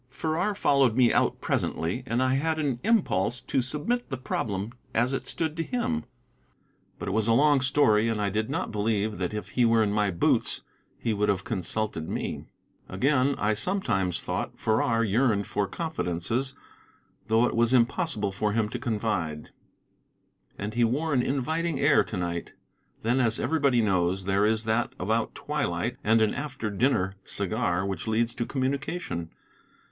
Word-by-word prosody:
Farrar 160 +8 -1
followed 140 - +3
me 125 -2 +5
out - - +1
presently, 85 +10 -1
and 120 +2 +1
I 130 0 +2
had 160 +4 +1
an 140 -6 -1
impulse 120 - +2
to 130 +1 0
submit 150 - -1
the 130 - -3
problem 105 -4 -3 0.2
as 120 +4 +2
it 135 - -3
stood 160 -2 -2
to - - 0
him. 240 +2 -2 0.9
But - - -6
it - - -2
was 110 0 +1
a 115 - +4
long 145 +2 +4
story, 130 -5 +3
and 115 -2 0
I 100 -1 0
did 110 +2 -1
not - - -2
believe 105 -1 -1
that 90 -2 -1
if 105 0 -5
he 125 - +1
were 115 -1 +4
in 105 - 0
my 105 -1 +2
boots 85 -2 +1 0.4
he 115 - -1
would 105 0 +1
have 95 -2 +1
consulted 95 -4 -3
me. - - -4 0.4
Again, 135 +6 +2
I 105 +1 +1
sometimes 105 - 0
thought - - -4
Farrar 115 +1 +1
yearned 110 -1 +2
for 100 -1 -1
confidences, 130 - -2 0.7
though 115 +2 +4
it - - -1
was 115 +1 +3
impossible 130 - +1
for 105 +2 -1
him 110 -1 +1
to 125 - -4
confide. 105 - -2 1.1
And 105 +2 -4
he 120 +1 +2
wore 145 +7 +1
an 125 - +3
inviting 150 +4 -1
air 145 0 +5
to - - -5
night. 85 -1 -3 0.5
Then, 120 +4 +2
as 115 -3 +2
everybody 140 -3 +2
knows, 95 -2 +1
there 100 +2 +2
is 110 0 +1
that 110 +1 0
about 110 +5 -1
twilight 125 -6 -2
and 110 +1 +4
an 110 - +1
after 140 -7 -4
dinner 100 -4 +1
cigar 100 -3 -1
which 95 0 -4
leads 115 +1 +1
to 120 - -3
communication. 135 - -2
115 Hz, 170 wpm, -27 LUFS, 105-135 Hz, 1.1 s, me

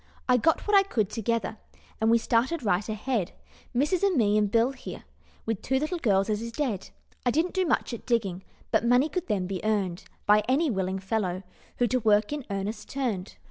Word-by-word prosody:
"I 250 - +5
got 320 +6 +2
what 415 - +4
I 395 - +8
could 220 - -1
together, 230 -1 -1 0.4
And 220 - +3
we 230 - +6
started 245 +7 +1
right 200 0 +1
ahead; 215 -2 -2 0.4
Missus 295 +8 +1
and 395 -5 +2
me 210 -3 +3
and 210 -1 +3
Bill 230 +4 +3
here, 260 - -9 0.4
With 225 -3 -2
two 265 - 0
little 310 +5 -2
gals 195 -7 +2
as 215 -1 -1
is 230 0 -5
dead. 230 -8 -2 0.3
I 245 - +2
didn't 320 +8 +1
do 375 -2 +1
much 275 - 0
at 235 - -8
digging, 200 -7 0 0.3
But - - +3
money 245 +5 +4
could 365 +2 -3
then 200 -4 0
be 185 -1 -4
earned 200 -5 -1 0.2
By 210 0 +5
any 285 +3 +3
willing 190 -2 -1
fellow 190 -2 -2 0.3
Who 245 - +3
to 255 +2 +1
work 210 +2 +3
in 290 -4 -5
earnest 200 +2 -4
turned. 230 -9 -3
230 Hz, 205 wpm, -27 LUFS, 205-265 Hz, 0.4 s, I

